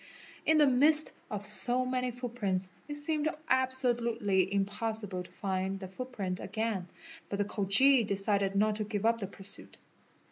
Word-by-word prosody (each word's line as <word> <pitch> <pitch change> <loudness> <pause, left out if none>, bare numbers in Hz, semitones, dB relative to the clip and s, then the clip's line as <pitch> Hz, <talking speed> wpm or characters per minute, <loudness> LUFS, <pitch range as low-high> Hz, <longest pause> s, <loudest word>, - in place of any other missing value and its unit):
In 315 - +4
the 300 - +6
midst 295 +4 +5 0.2
of 205 -1 -4
so 245 +4 +5
many 255 0 -2
footprints 230 -7 -3 0.2
it 295 - -6
seemed 305 +1 -1 0.2
abso 260 -1 +2
lutely 205 -5 0
impossible 200 -1 -3
to 180 - -11
find 190 0 -3
the 190 - -7
footprint 195 -3 -5
again 210 -3 -3 0.4
but 200 - -3
the 205 - 0
Khoji 220 +7 +3
decided 200 -1 -1
not 210 +1 +1
to 215 - -2
i 210 - -11
yeup 230 +3 +1
the 195 - -4
pursuit. 195 +1 -3
215 Hz, 155 wpm, -30 LUFS, 195-255 Hz, 0.4 s, the